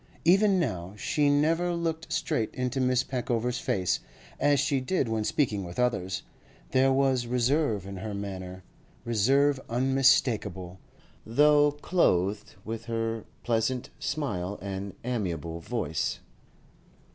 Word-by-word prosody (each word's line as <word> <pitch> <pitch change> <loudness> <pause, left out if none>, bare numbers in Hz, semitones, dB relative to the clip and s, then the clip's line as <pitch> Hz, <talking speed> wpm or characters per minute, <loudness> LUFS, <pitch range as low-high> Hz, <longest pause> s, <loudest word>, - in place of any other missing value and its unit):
Even 195 +2 +5
now 95 - -3
she 145 +7 +1
never 165 +5 +2
looked 165 -1 -3
straight 110 - -1
into 125 +1 -1
Miss 125 0 +2
Peckover's 125 -1 -1
face, 90 -5 0 0.4
as 145 0 +3
she 140 - +1
did 135 0 0
when 110 -1 -1
speaking 105 -5 0
with 85 -1 -8
others; 100 -7 0 0.5
there 130 +1 +4
was 130 -2 +2
reserve 125 - +1
in 100 0 -7
her 105 +2 -5
manner, 95 -2 -6 0.4
reserve 135 +5 +3
unmistakable, 115 -8 +2 0.4
though 145 +4 +4
clothed 105 - 0
with 115 +1 -5
her 115 -1 -2 0.2
pleasant 120 +2 0
smile 105 -10 -2
and 95 0 -5
amiable 85 - -3
voice. 80 -5 -2
120 Hz, 120 wpm, -28 LUFS, 100-140 Hz, 0.5 s, Even